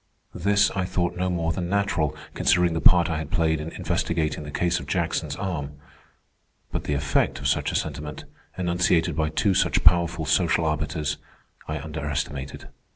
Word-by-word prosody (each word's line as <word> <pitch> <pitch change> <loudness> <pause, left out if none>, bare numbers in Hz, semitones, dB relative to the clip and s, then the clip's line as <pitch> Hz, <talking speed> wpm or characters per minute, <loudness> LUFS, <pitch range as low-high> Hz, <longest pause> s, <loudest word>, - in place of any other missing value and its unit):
This 100 +2 +2
I 95 -1 -1
thought 90 -1 -1
no 90 +1 -1
more 85 -2 0
than 85 0 -3
natural, 100 -6 0 0.2
considering 90 -1 +3
the 80 - -1
part 90 -2 +6
I 80 -1 -1
had 80 - -5
played 80 -2 +1
in 80 - -5
investigating 80 -2 -1
the 75 - -8
case 85 +3 0
of - - -9
Jackson's - - -1
arm. 80 -8 -4 1.0
But - - -3
the 75 - 0
effect 70 +1 +1
of - - -2
such - - +1
a - - -4
sentiment, 75 0 -4 0.3
enunciated 85 -2 +1
by 80 0 +1
two 100 +4 +1
such - - +2
powerful 85 -2 +4
social 85 +2 +2
arbiters, 75 -1 -1 0.5
I 75 - -2
underestimated. 75 -2 -4
80 Hz, 165 wpm, -25 LUFS, 75-90 Hz, 1.0 s, part